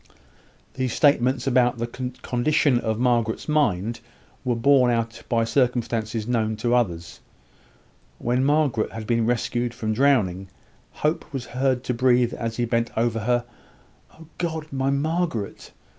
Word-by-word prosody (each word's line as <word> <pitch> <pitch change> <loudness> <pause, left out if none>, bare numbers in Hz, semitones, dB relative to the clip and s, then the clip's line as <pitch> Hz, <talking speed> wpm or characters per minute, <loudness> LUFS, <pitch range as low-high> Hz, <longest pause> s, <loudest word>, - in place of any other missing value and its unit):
These 130 -2 -2
statements 130 -3 +3
about 125 -2 +3
the 115 - -2
condition 125 +2 0
of 110 -2 -2
Margaret's 120 -2 0
mind 115 - +1 0.4
were 125 -3 0
borne 130 +1 +4
out 115 -1 -1
by 115 -1 +2
circumstances 115 -2 0
known 110 -3 0
to 120 +3 -1
others. 85 -9 -1 1.0
When 125 +2 0
Margaret 145 -5 +1
had 110 -1 -6
been 115 0 +1
rescued 120 0 -1
from 110 -2 -2
drowning, 105 -8 +2 0.6
Hope 155 +3 -1
was 135 -4 -4
heard 130 -1 +1
to 125 - -1
breathe, 125 0 +3
as 115 -1 -4
he 120 - +1
bent 115 0 0
over 115 0 +1
her, 120 +2 0 0.7
"Oh 160 - -14
God! 160 -3 -2
my 135 0 0
Margaret!" 145 - -2
120 Hz, 140 wpm, -24 LUFS, 115-130 Hz, 1.0 s, borne